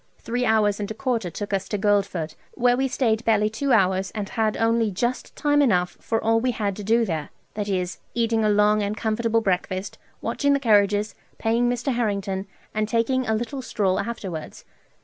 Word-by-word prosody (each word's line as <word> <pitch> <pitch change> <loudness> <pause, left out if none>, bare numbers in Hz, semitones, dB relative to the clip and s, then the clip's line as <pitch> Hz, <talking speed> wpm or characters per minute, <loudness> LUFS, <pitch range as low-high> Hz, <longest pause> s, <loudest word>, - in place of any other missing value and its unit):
Three 245 +2 -2
hours 210 -2 +3
and 205 - -3
a 220 - -5
quarter 235 -7 -1
took 205 +4 -5
us 195 0 -1
to 210 - -1
Guildford, 195 -6 0 0.2
where 245 0 +3
we 265 +2 +1
staid 235 -4 0
barely 215 -2 +2
two 270 +5 -1
hours, 190 -4 +3
and 210 -1 -3
had 220 -2 0
only 225 -1 +2
just 240 +6 -2
time 290 -1 +2
enough 180 -10 +2
for 225 - -1
all 225 0 +2
we 255 +2 0
had 205 -3 -2
to 210 - -6
do 230 +3 +3
there; 160 -6 -3 0.2
that 205 -1 -3
is, 180 -2 -2 0.2
eating 230 -1 +1
a 215 - +3
long 210 +1 +4
and 205 +1 -2
comfortable 225 +1 +1
breakfast, 185 -1 -2 0.2
watching 285 0 +1
the 280 - +2
carriages, 210 -3 +3 0.2
paying 235 +2 +1
Mr. 245 +2 -1
Harrington, 200 -4 -1 0.3
and 215 0 -1
taking 245 +3 +1
a 220 - +2
little 240 +5 -3
stroll 195 -6 0
afterwards. 190 -9 -5
215 Hz, 190 wpm, -24 LUFS, 200-235 Hz, 0.3 s, long